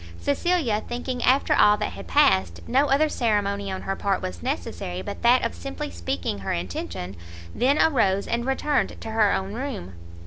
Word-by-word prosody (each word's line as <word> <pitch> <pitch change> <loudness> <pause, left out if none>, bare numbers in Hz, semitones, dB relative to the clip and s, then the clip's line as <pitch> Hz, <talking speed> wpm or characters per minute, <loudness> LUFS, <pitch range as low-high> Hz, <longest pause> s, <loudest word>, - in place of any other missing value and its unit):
Cecilia, 225 - +1
thinking 245 +1 -4
after 265 +3 +3
all 210 0 +5
that 210 - -2
had 100 -2 -9
passed, 85 0 +3
no 275 +4 +3
other 285 +3 +3
ceremony 200 -6 0
on 190 - -5
her 195 - -2
part 195 -1 0
was 90 -2 -6
necessary 90 +3 -4
but - - -6
that 245 +2 +4
of - - -2
simply 85 +2 -6
speaking 85 +3 -3
her 95 - -3
intention, 85 +1 -5 0.4
then 275 +4 +2
arose 200 -10 +3
and 235 0 -1
returned 270 +2 0
to 225 - -6
her 220 -2 +3
own 195 +1 -2
room. 240 - -5
200 Hz, 175 wpm, -24 LUFS, -, 0.4 s, all